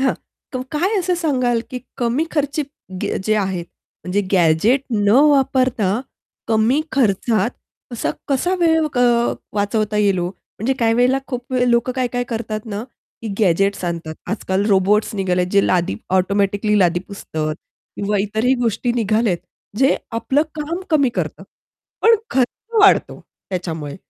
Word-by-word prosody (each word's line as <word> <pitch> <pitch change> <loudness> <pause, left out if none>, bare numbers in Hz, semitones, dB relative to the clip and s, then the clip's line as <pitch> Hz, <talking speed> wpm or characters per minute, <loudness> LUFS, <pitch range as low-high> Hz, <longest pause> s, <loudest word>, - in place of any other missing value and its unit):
हां, 265 - +2 0.4
क - - -2 0.2
काय 370 +8 +1
असं 360 -1 0
सांगाल, 255 -8 +1
की 250 - -4 0.2
कमी 245 +5 0
खर्ची 295 0 0 0.4
गे - - -1
जे 215 +1 +2
आहेत 190 -4 -1 0.4
म्हणजे 185 +3 0
गॅजेट 180 - +4
न 205 -3 +1 0.2
वापरता 255 -7 +2 0.5
कमी 225 +6 +3
खर्चात 220 -3 +2 0.4
कसा 235 - -1 0.2
कसा 320 +7 +1
वेळ 320 -2 +3
अ, - - +3 0.5
वाचवता 210 +1 0
येईल 200 -3 +2
ओ? 175 0 -1
म्हणजे 220 +5 -4
काही 225 -1 +2
वेळेला 250 +3 +3
खूप 250 -1 -6
लोक 235 +1 +2
काय-काय 245 -1 -1
करतात 225 -2 -3
ना, 210 -1 -4 0.4
की 225 - -4
गॅजेट्स 195 -1 +2
आणतात. 165 -2 -4 0.2
आजकाल 200 -2 -1
रोबोट्स 205 +3 +2
निघालेत, 180 -2 0
जे 200 -1 +4
लादी 175 - +1 0.2
ऑटोमॅटिकली 200 +2 +1
लादी 175 -2 +3
पुसत 200 -5 -10 0.6
किंवा 205 0 0
इतरही 220 +5 +1
गोष्टी 235 +2 0
निघालेत 220 -4 +1 0.4
जे 270 +2 +4 0.2
आपल 245 +4 0 0.2
काम 315 +4 -3
कमी 285 -4 +4
करत. - - -3 0.6
पण 455 +1 +7 0.2
खर्च 265 - -1
वाढतो 410 -2 +4 0.3
त्याच्यामुळे, 165 -5 -4
220 Hz, 140 wpm, -20 LUFS, 195-260 Hz, 0.6 s, पण